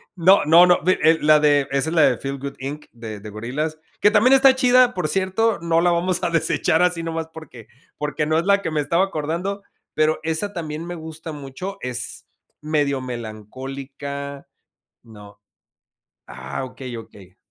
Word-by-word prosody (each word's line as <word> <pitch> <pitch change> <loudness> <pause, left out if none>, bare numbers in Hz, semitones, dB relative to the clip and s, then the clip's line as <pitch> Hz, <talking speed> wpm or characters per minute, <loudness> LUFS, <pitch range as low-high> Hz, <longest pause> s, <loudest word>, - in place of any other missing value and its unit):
No, 185 +3 +5
no, 165 +4 +7
no, 180 0 +3
vi 185 +3 +4
eh, 160 +1 +5
la 150 0 +5
de 145 -2 +3
esa 140 +3 0
es 165 - -3
la 160 - +5
de - - +4
Feel 135 0 -5
Good 140 +1 -6
Inc. 145 +3 -6
de 115 -3 -8
de 105 +1 -9
Gorillaz, 130 +9 -4 0.2
que 205 - +6
también 225 +5 +4
está 270 0 +6
chida, 255 -1 +4
por 180 -4 -2
cierto. 195 +4 +1
No 170 -1 +1
la 175 - +3
vamos 175 +1 0
a - - +1
desechar 165 0 +1
así 180 -2 +1
nomás 165 -1 -4
porque 130 -9 -12 0.3
porque 150 0 -2
no 155 +1 +1
es 170 - -3
la 200 0 +3
que 165 - -3
me 150 -1 0
estaba 170 +6 +1
acordando, 180 +4 -4 0.3
pero 155 0 +1
esa 160 +6 -2
también 160 -1 -5
me 175 0 -6
gusta 160 0 -8
mucho. 150 +7 -7
Es 125 -1 -5 0.4
medio 145 -3 0
melancólica 135 +5 -7 0.6
no. 105 -3 -15 0.9
Ah, 65 - -6
okey, 125 -1 -8
okey. 100 -4 -13
155 Hz, 180 wpm, -22 LUFS, 135-175 Hz, 0.9 s, no